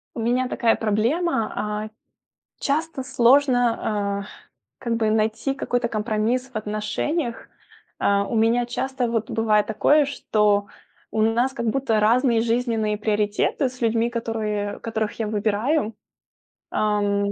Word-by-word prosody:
У - - -4
меня 245 +3 +1
такая 230 -2 +2
проблема, 225 +5 0
а. 210 0 -3 0.7
Часто 300 -1 -1
сложно, 240 -6 +2
а, - - -8 0.5
как 235 -1 -1
бы 220 -2 +1
найти 220 +4 0
какой-то 245 -3 -1
компромисс 225 +3 -1
в - - -31
отношениях. 215 +6 -3 0.5
А, 200 0 +2
у 230 - -4
меня 230 +2 +3
часто 255 +1 -2
вот 225 -2 -1
бывает 215 -2 +2
такое, 290 +7 +3
что 210 -7 +1 0.5
у 220 - 0
нас 235 +4 +2
как 235 -4 -3
будто 225 -2 +1
разные 230 +2 +3
жизненные 225 -2 0
приоритеты 215 +5 0
с 255 - -14
людьми, 230 0 +2
которые 215 -3 -3
которых 220 -1 -3
я 220 - -1
выбираю. 215 +5 0 0.8
Ам. 205 -1 0
225 Hz, 130 wpm, -23 LUFS, 215-250 Hz, 0.8 s, меня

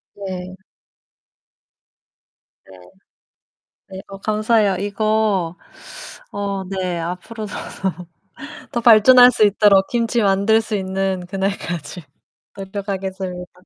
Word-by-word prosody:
네. 185 -2 -7 2.2
네. 95 - -14 1.1
네. 190 -1 -9
어 195 - -9
감사해요. 215 -1 +1
이거 205 -3 0 0.8
어 200 -1 -3
네 185 -3 -3
앞으로도 200 +6 -6 0.3
더 180 -2 -3 0.6
더 235 - -1
발전할 245 +2 +7
수 220 - +2
있도록 200 -1 +4
김치 235 0 0
만들 200 +2 +3
수 220 -1 -4
있는 190 -1 -2
그날까지 190 -3 -4 0.5
노력하겠습니다. 190 -2 -5
195 Hz, 190 characters per minute, -20 LUFS, 185-215 Hz, 2.2 s, 발전할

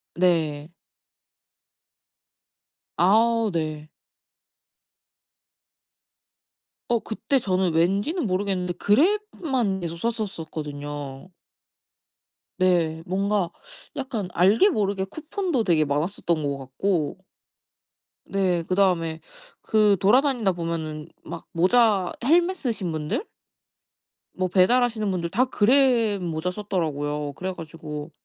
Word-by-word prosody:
네. 160 -4 +1 2.3
아우 225 +4 +3
네. 155 -2 -3 3.0
어 235 -1 +2
그때 225 +5 -1
저는 185 -7 0
왠지는 200 - +1
모르겠는데 185 -1 -1
그랩만 265 - +1
계속 170 -1 -4
썼었었거든요. 150 -8 -5 1.3
네. 170 -3 +2
뭔가 195 0 0 0.4
약간 235 -9 -4
알게 205 - +5
모르게 200 - 0
쿠폰도 315 - -2
되게 165 -6 +3
많았었던 160 +3 -1
것 140 -1 -1
같고 145 +5 -2 1.1
네. 185 -3 0
그다음에 175 -3 +1 0.4
그 210 -2 +3
돌아다니다 240 - +3
보면은 165 -3 -4 0.2
막 165 0 -8
모자 190 +1 +3
헬멧 345 +7 +3
쓰신 225 - -2
분들? 155 - -3 1.1
뭐 185 0 -1
배달하시는 215 +4 +2
분들 175 -3 -2
다 245 +9 +2
그랩 235 -3 +3
모자 170 0 -2
썼더라고요. 150 -7 -3
그래 190 +6 -4
가지고 155 -2 -8
185 Hz, 205 characters per minute, -24 LUFS, 165-220 Hz, 3.0 s, 알게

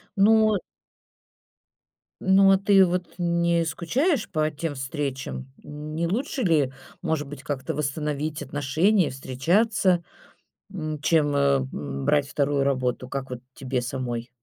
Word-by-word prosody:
Ну. 215 +1 +5 1.6
Ну, 195 +1 +5
а 195 - +6
ты 195 -1 +5
вот 180 0 -3
не 170 -1 +1
скучаешь 225 - 0
по 155 0 +1
тем 150 0 -4
встречам? 135 -1 -4
Не 155 +3 -4
лучше 255 - -2
ли, 150 -7 +2 0.3
может 160 -4 -1
быть, 140 -1 -9
как-то 140 -3 -3
восстановить 150 +1 -2
отношения 155 +8 +2
и - - -2
встречаться, 175 - +1 0.7
м, 155 -4 -4
чем, 150 -3 +2
э, - - +3 0.3
м, 70 -1 -5
брать 145 -2 +3
2 145 -1 0
работу, 130 -2 -1
как 135 0 -5
вот 125 -1 -6
тебе 130 -2 -2
самой? 120 -2 -4
150 Hz, 130 wpm, -25 LUFS, 135-180 Hz, 1.6 s, а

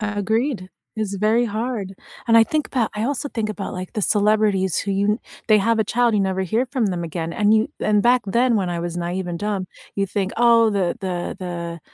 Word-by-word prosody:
Agreed. 210 +1 -1 0.3
It's 215 -3 -3
very 220 +4 +2
hard, 215 -2 -3 0.3
and 230 - +6
I 225 - +7
think 305 +5 -1
about 240 -5 -1
I 210 +2 -2
also 285 +2 -2
think 220 -2 -2
about, 205 -2 -5
like, 185 0 -7
the 215 - -2
celebrities 205 -3 +2
who 200 - -2
you 200 +2 +1 0.3
they 215 - +7
have 225 +2 +2
a 220 - +2
child, 235 +2 +2
you 210 - +2
never 190 -1 0
hear 225 +8 0
from 250 -3 -1
them 180 -3 -2
again, 165 0 -4
and 210 +3 +3
you 220 0 +2
and 210 -1 +2
back 245 +2 +4
then, 235 +4 +2
when 190 -3 0
I 175 -1 -2
was 170 0 -4
naive 180 +2 -3
and 170 -1 -4
dumb, 200 -1 -2 0.3
you 200 - 0
think, 195 0 -2
"Oh, 230 -1 +5
the 195 -4 0
the 180 -3 -3
the 170 -2 -5
210 Hz, 220 wpm, -22 LUFS, 190-225 Hz, 0.3 s, I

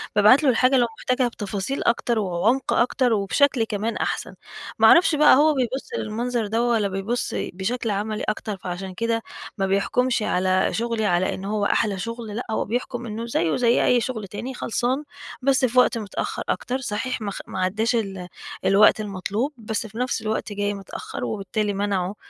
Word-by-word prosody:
بابعت 215 +8 +6
له 275 - +4
الحاجة 255 +2 +3
اللي 245 -2 +4
هو - - -3
محتاجها 255 0 +1
بتفاصيل 205 +3 -4
أكتر 235 -1 +1
وعمق 210 +7 +1
أكتر 245 0 +2
وبشكل 225 +5 +2
كمان 220 +1 -2
أحسن، - - -3 0.4
ما - - +7
أعرفش 340 -2 +6
بقى 300 -3 +7
هو 305 +2 +4
بيبُص 260 - -2
المنظر 230 +1 -2
ده 225 +3 0
والَّا 230 -4 +2
بيبُص 195 +5 -2
بشكل 215 +5 -2
عملي 210 +2 -2
أكتر، 210 -1 -3
فعشان 185 +1 -6
كده 230 +2 -1 0.4
ما 195 0 0
بيحكُمش 235 +4 +1
على 185 0 +1
شغلي 230 -1 -1
على 180 -1 +1
إن 190 - -7
هو 205 0 -1
أحلى 205 -2 +1
شغل 230 0 -5
لا، 245 - -4
هو - - 0
بيحكُم 245 +2 -3
إنه 225 +1 -5
زيه 170 -8 0
زي 240 -1 +3
أي 245 -1 +4
شغل 220 -6 -4
تاني، 240 +7 -6
خلصان 250 +3 -1 0.4
بس 265 0 +3
في 250 +1 +3
وقت 250 - +4
متأخر 210 -4 -4
أكتر 255 +1 -1
صحيح 255 +1 -3
ما 200 -1 -3
خ - - -6
ما 190 - -5
عدّاش 215 +6 +1
ال 195 -5 -3 0.4
الوقت 200 +2 +5
المطلوب، 210 +7 -3
بس 220 0 -3
في 220 - -12
نفس 250 +2 -1
الوقت 215 -1 -3
جاي 205 0 -1
متأخر 195 -2 -6
وبالتالي 205 0 -2
منعه 195 -1 -1
220 Hz, 180 wpm, -23 LUFS, 200-245 Hz, 0.4 s, ما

